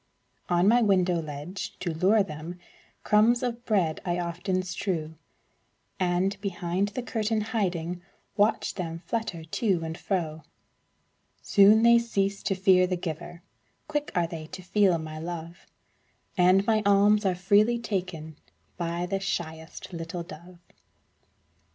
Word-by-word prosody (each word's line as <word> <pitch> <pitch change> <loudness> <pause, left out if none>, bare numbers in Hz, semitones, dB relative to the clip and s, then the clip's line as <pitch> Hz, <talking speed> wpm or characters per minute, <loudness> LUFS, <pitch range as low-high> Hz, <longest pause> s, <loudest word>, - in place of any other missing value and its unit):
On 175 +1 +3
my 240 +3 +5
window 185 -5 +2
ledge, 155 +5 -6
to 175 -3 -3
lure 195 +6 +3
them, 160 0 -7 0.5
Crumbs 230 +4 +4
of 240 -1 -3
bread 185 -8 +1
I 175 -1 -1
often 180 +2 -2
strew, 175 -3 -3 0.9
And, 185 +2 0
behind 185 0 -1
the 255 - -2
curtain 220 -2 -1
hiding, 180 -6 -2 0.3
Watch 210 +1 +2
them 165 -2 -5
flutter 220 -8 -3
to 180 +1 0
and 160 0 -4
fro. 165 -5 -3 1.0
Soon 205 +3 +6
they 235 0 +7
cease 200 -4 -1
to 195 - -1
fear 185 -1 +4
the 180 0 -1
giver, 170 +1 -6 0.4
Quick 295 -1 -2
are 175 -1 +2
they 160 -2 -7
to 185 - -9
feel 190 -1 +3
my 155 -1 -7
love, 170 +1 -7 0.7
And 185 +1 +4
my 220 -1 +2
alms 205 +1 +4
are 190 -2 +1
freely 205 +6 +3
taken 180 -9 -4 0.4
By 170 0 -2
the 195 +2 -2
shyest 160 -3 -5
little 165 +1 -5
dove. 170 +2 -12
185 Hz, 135 wpm, -27 LUFS, 170-205 Hz, 1.0 s, they